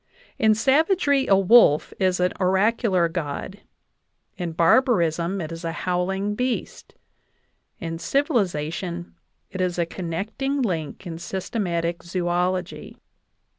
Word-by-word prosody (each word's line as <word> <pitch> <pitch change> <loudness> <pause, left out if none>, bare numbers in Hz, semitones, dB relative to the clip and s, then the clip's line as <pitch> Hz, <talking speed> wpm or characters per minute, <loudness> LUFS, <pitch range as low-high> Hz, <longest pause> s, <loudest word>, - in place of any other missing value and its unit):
In 220 -1 +4
savagery, 285 - +2
a 195 - +5
wolf 195 -6 +5
is 185 -1 +1
an 180 0 +1
oracular 190 -1 +2
god; 165 +4 -5 0.7
in 175 -3 -4
barbarism, 170 - +2
it 160 -2 -5
is 165 +1 -7
a 165 - -2
howling 190 +3 -1
beast; 250 +2 -4 0.8
in 165 -2 -5
civilization, 175 - -1 0.4
it 190 -2 -4
is 180 -1 -1
a 170 - +1
connect 180 +7 -5
ing 275 0 0
link 165 -5 -3
in 165 -2 -6
systematic 175 -2 -3
zoology. 180 +1 -2
185 Hz, 115 wpm, -23 LUFS, 170-215 Hz, 0.8 s, a